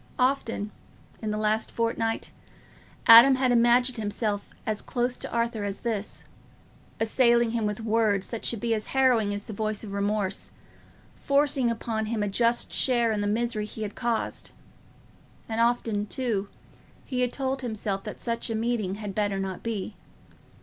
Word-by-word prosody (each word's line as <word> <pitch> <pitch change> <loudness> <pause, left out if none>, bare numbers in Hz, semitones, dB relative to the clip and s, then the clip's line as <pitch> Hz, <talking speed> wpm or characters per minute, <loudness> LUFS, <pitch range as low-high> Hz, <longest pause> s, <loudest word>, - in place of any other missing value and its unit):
Often, 250 -5 0 0.5
in 220 - -3
the 210 - -1
last 215 +1 0
fortnight, 230 -1 -1 0.7
Adam 235 +4 +10
had 260 -1 +2
imagined 240 +1 +4
himself 205 -1 -2 0.2
as 215 -1 0
close 245 0 -1
to - - -6
Arthur 235 -2 -1
as 200 -1 -4
this, 215 -4 -3 0.8
assailing 235 0 +3
him 225 -2 0
with 210 +2 -3
words 215 -3 +1
that 230 - -5
should 230 - -1
be 230 +1 0
as 215 -1 -3
harrowing 245 -6 +4
as 205 0 -4
the 215 - -8
voice 215 +1 -2
of 210 - -7
remorse, 200 -1 -1 0.7
forcing 280 -3 +2
upon 225 -1 -2
him 220 -1 -1
a - - 0
just 230 +4 +1
share 240 -3 +3
in 210 -1 -1
the 205 - 0
misery 220 0 -1
he 215 +1 -6
had 205 -1 -4
caused; 235 -2 -2 1.0
and 225 0 -1
often, 230 -3 +1
too, 210 -5 -2 0.6
he 250 -2 -2
had 250 -1 +1
told 265 0 -2
himself 210 -5 -3
that - - -7
such 230 +1 -2
a 225 - -1
meeting 220 -4 -1
had 205 -1 -6
better 205 -1 0
not 190 -1 -4
be. 220 -3 -4
225 Hz, 165 wpm, -27 LUFS, 210-240 Hz, 1.0 s, Adam